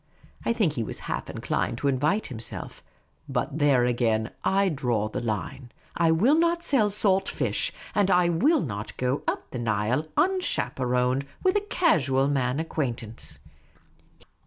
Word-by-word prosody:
I - - +1
think 210 -10 +1
he 115 - -2
was - - -6
half - - -4
inclined - - -2
to 140 - -1
invite 145 +10 +1
himself; 115 -4 -5 0.5
but 135 +3 -2
there 140 -4 +4
again 115 -3 +1
I 195 +1 +3
drew 125 - 0
the - - -2
line. 115 - -4 0.2
I 165 -1 +3
will 190 - +4
not 340 +1 +2
sell 235 -10 +2
salt 195 -2 +2
fish; - - 0 0.2
and 205 -2 +2
I 180 -1 +4
will 265 - +3
not 105 -5 -5
go 130 +2 0
up - - -3
the 125 - -4
Nile, 115 +6 0
unchaperoned, 130 - +1 0.2
with 375 +1 +3
a 415 - +3
casual 140 - +2
man 135 -1 0
acquaint 140 -7 -2
ance. 110 +1 -7
140 Hz, 155 wpm, -26 LUFS, 120-195 Hz, 0.5 s, there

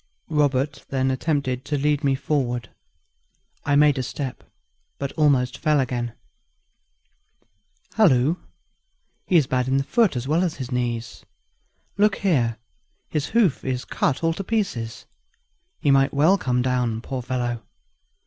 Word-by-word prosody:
Robert 145 -1 +1
then 130 -1 +1
attempted 130 -2 -1
to 145 - -1
lead 145 +1 +1
me 135 -1 +2
forward. 125 -5 -2 0.9
I 145 -1 +1
made 145 -2 +5
a - - +1
step, 130 +1 -5 0.5
but 140 -1 -3
almost 140 -4 +2
fell 155 -2 +2
again. 120 -3 -2 1.8
"Halloo! 155 - +4 0.9
he's 170 -6 +4
bad 125 -1 0
in 130 - +1
his 135 0 +1
foot 225 - +2
as 125 +1 -3
well 160 +5 +2
as 175 -4 -1
his 130 -1 -6
knees. 120 -2 -3 0.8
Look 210 -1 +4
here 125 - +1 0.5
his 150 -3 -1
hoof 215 - +2
is 130 -1 -2
cut 145 +2 -1
all 165 0 +2
to 195 - -5
pieces; 125 - -2 0.7
he 145 - +2
might 135 +1 +3
well 155 +7 +5
come 125 -9 0
down, 125 -3 0
poor 130 +1 -4
fellow! 120 -2 -2
135 Hz, 140 wpm, -23 LUFS, 125-150 Hz, 1.8 s, made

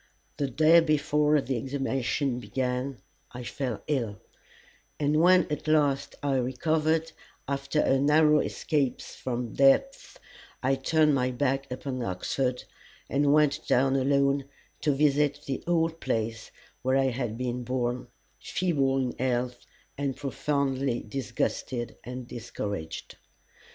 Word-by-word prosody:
The 140 -2 -1
day 155 +6 +6
before 150 -1 +2
the 130 -1 -2
examination 135 0 -1
began 125 +1 -2 0.4
I 125 0 -6
fell 125 -2 -4
ill; 120 -8 -1 0.8
and 150 +1 +2
when 185 +1 +6
at 150 - -3
last 145 -3 +2
I 140 -2 +1
recovered, 155 +5 0 0.4
after 140 +2 0
a 135 - +3
narrow 150 +2 +5
escape 145 -4 -1
from 120 -3 -5
death, 140 - +3 0.5
I 135 +1 +3
turned 150 +3 +3
my 130 -2 +1
back 135 +1 -1
upon 130 0 -4
Oxford, 125 +6 -2 0.5
and 140 +1 +3
went 150 -1 +3
down 135 +1 +3
alone 140 +1 +2 0.3
to 150 - +1
visit 145 0 +2
the 135 - -3
old 165 -1 +1
place 110 -3 -2 0.3
where 130 +2 +2
I 135 -1 +2
had 120 -3 -3
been 125 0 -3
born, 125 0 -2 0.3
feeble 140 -7 0
in 130 -2 -1
health 125 -1 -1 0.3
and 140 -2 -1
profoundly 135 -2 -1
disgusted 120 0 -3
and 125 0 -7
discouraged. 105 -8 -6
135 Hz, 125 wpm, -28 LUFS, 125-150 Hz, 0.8 s, day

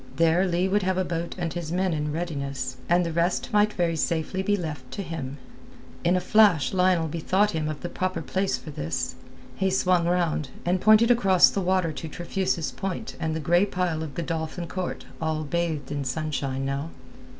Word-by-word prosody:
There 165 +3 +3
Leigh 180 +1 +1
would 205 +2 +2
have 185 -1 0
a 185 - +1
boat 170 0 -3
and 170 -3 -2
his 170 -2 -4
men 185 0 +1
in 150 -1 -1
readiness, 140 -6 -3
and 175 +1 +4
the 165 - -3
rest 175 +7 0
might 210 0 +4
very 170 -2 0
safely 165 +3 -1
be 205 +1 +1
left 150 -7 -5
to 200 - -4
him. 150 -5 -5 0.7
In 175 +2 +3
a - - +3
flash 180 -9 +4
Lionel 180 -3 +3
bethought 185 +6 +1
him 155 -2 -2
of 155 -2 -5
the - - -3
proper 185 -2 -2
place 190 +4 0
for 155 - -9
this. 125 - -3 0.4
He 190 0 +1
swung 180 -2 +2
round, 170 -5 0 0.2
and 180 +1 +1
pointed 215 +3 +6
across 195 -7 +5
the 200 - -1
water 185 -2 +1
to 160 +2 -6
Trefusis 175 0 -2
Point 195 +3 -4
and 160 -1 -1
the - - -2
grey 175 +4 +3
pile 180 -4 -1
of 155 -4 -6
Godolphin 165 0 -3
Court 185 +1 -4 0.2
all 160 -1 -1
bathed 155 -3 -2
in 145 -1 -2
sunshine 135 -1 -2
now. 140 +3 -2
170 Hz, 195 wpm, -26 LUFS, 155-185 Hz, 0.7 s, pointed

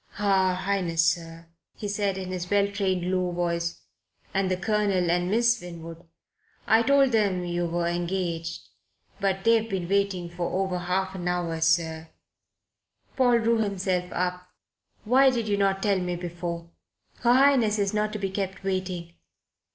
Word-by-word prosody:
"Her 190 -2 +2
Highness, 180 -3 0
sir," 165 0 -1 0.3
he 210 - -5
said 200 -1 -1
in 185 -1 -5
his 180 -1 -4
well 200 0 +3
trained, 190 -3 -1
low 185 -1 0
voice, 170 -1 -2 0.5
"and 195 -1 +1
the 185 - 0
Colonel 195 -3 +1
and 175 +1 +1
Miss 235 +2 +2
Winwood. 165 -1 -9 0.6
I 220 +1 +5
told 275 +1 +4
them 200 -5 +1
you 175 0 -1
were 170 +1 -1
engaged. 170 -1 -2 0.6
But 195 -1 0
they've 230 0 +3
been 185 -4 -2
waiting 200 -2 0
for 175 +2 -3
over 180 -1 -3
half 185 +2 -1
an 180 -2 -5
hour, 175 -2 -1
sir." 160 -1 +1 1.1
Paul 245 -3 +4
drew 230 0 +2
himself 185 -4 -1
up. 180 0 -2 0.6
"Why 260 +5 +5
did 235 -4 -1
you 205 -1 +1
not 195 -1 +1
tell 200 -2 +2
me 180 -1 -2
before? 170 -1 -5 0.5
Her 240 0 +4
Highness 255 -5 +4
is 200 0 0
not 210 0 0
to - - -2
be 195 -2 -3
kept 195 -1 -4
waiting. 185 -3 -3
185 Hz, 160 wpm, -26 LUFS, 175-205 Hz, 1.1 s, I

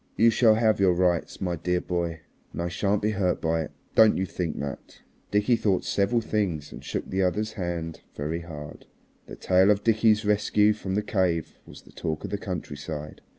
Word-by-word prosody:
You 115 +1 +6
shall 110 -1 +5
have 110 -2 +2
your 95 -2 +4
rights, 90 -1 0
my 90 -2 -1
dear 90 +2 0
boy, 85 -2 -3 0.3
and 85 - -4
I 85 - -2
shan't 100 +4 0
be 105 - +2
hurt 95 -3 0
by 80 0 0
it. 80 - -6 0.2
Don't 110 -1 +6
you 95 - 0
think 85 -3 -4
that." 70 -1 -7 0.3
Dickie 105 +4 +3
thought 100 -5 +1
several 105 +4 +1
things 95 -9 -2
and - - -10
shook - - -4
the 95 +1 -1
other's 105 +4 0
hand 85 -4 -4
very 80 +4 -3
hard. 75 -3 -9 0.4
The - - -8
tale 95 +8 +3
of 105 0 +3
Dickie's 110 -1 +3
rescue 105 0 +3
from 95 -2 -4
the 105 - 0
cave 90 -6 -1
was - - -13
the - - -18
talk 80 -1 -4
of - - -5
the 100 - -2
countryside. 75 -5 -6
95 Hz, 195 wpm, -26 LUFS, 85-105 Hz, 0.4 s, You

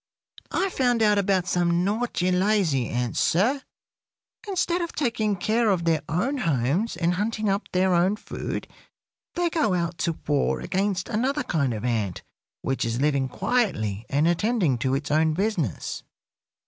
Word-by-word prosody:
"I 385 0 0
found 245 -6 +2
out 210 -1 +4
about 190 -2 +1
some 175 -1 +1
naughty, 205 -3 0
lazy 180 - +2
ants, 120 0 -1
sir. 240 - +2 0.9
Instead 360 -2 0
of 340 - -4
taking 230 -7 0
care 220 +4 +1
of 180 -4 +1
their 160 -2 +2
own 235 - 0
homes 165 - 0
and 170 0 +1
hunting 215 +3 -1
up 200 +1 0
their 185 0 +2
own 180 +4 +3
food, - - -5 0.7
they 345 -1 0
go 260 - +1
out 170 -1 -2
to 170 -3 -1
war 145 -2 +1
against 195 -1 -1
another 260 +6 0
kind 140 - 0
of 110 +1 -4
ant, 110 -7 -1 0.4
which 135 - -1
is 115 +1 -1
living 140 -2 +1
quietly 115 - -1
and 145 +4 +2
attending 175 - +1
to 130 +2 +1
its 145 +1 -3
own 155 +1 +3
business. 185 - -2
180 Hz, 155 wpm, -25 LUFS, 150-220 Hz, 0.9 s, out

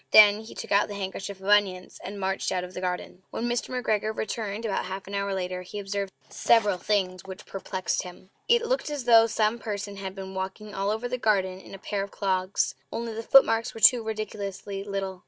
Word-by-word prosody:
Then 210 -1 +8
he 220 - -11
took - - -7
out 200 +1 +4
the 205 - -6
handkerchief 195 0 -5
of 190 - -8
onions, 200 -3 +2
and 200 +2 -6
marched 190 0 -1
out 180 -1 0
of 180 0 -8
the 185 - -5
garden. 180 0 -3
When 235 - -3
Mr. 240 0 -1
McGregor 220 -4 -1
returned 220 0 -3
about 205 - -1
half 190 +1 -5
an 200 - -9
hour 200 0 -1
later 180 -1 -3
he 180 +3 -8
observed 200 -1 -3 0.2
several 210 -5 +3
things 185 -3 0
which 190 -1 -9
perplexed 190 -1 -2
him. 185 +1 -11 0.2
It 475 0 +5
looked - - 0
as 290 -3 -3
though 230 -1 +7
some 220 +1 +1
person 205 -2 -4
had 190 -1 -5
been 190 -1 -7
walking 190 +3 -5
all 195 +1 -1
over 220 +3 -1
the 250 +1 -3
garden 190 -4 +1
in 195 - -11
a - - -8
pair 200 +1 -3
of 200 - -4
clogs 190 -1 0 0.2
only 230 -1 -3
the 225 - -4
footmarks 230 -1 +5
were - - -6
too 235 +3 +7
ridiculously 205 -2 -4
little! 195 -2 -4
200 Hz, 215 wpm, -27 LUFS, 190-220 Hz, 0.2 s, Then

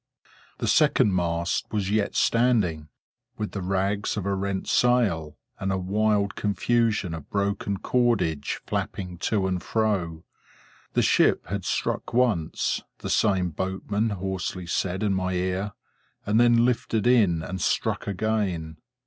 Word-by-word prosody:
The - - -3
second 100 - +4
mast 85 -1 0
was 100 -2 -1
yet 105 -1 0
standing, 105 -11 +2 0.5
with 105 -1 -3
the 95 - -4
rags 95 +3 -1
of 100 - -3
a 100 - 0
rent 95 0 -2
sail, 100 -12 +2 0.2
and 95 0 -1
a 95 - 0
wild 100 +2 +1
confusion 105 -3 0
of 80 -3 -8
broken 100 0 -1
cordage 100 - 0
flapping 90 -3 -4
to 100 +1 0
and 90 -2 -1
fro. 95 -8 -1 0.7
The - - +2
ship - - +3
had 100 -1 -3
struck - - -2
once, 110 -11 +1 0.2
the - - -5
same 95 -5 +2
boatman 95 +6 -2
hoarsely 95 -2 -3
said 90 +3 -1
in 100 -2 +2
my 95 -1 -1
ear, 95 +3 -1 0.5
and 105 +2 +2
then 120 0 +5
lifted 115 -3 0
in 100 -10 +4
and 95 +1 -5
struck - - 0
again. 95 -6 -1
100 Hz, 140 wpm, -25 LUFS, 90-110 Hz, 0.7 s, then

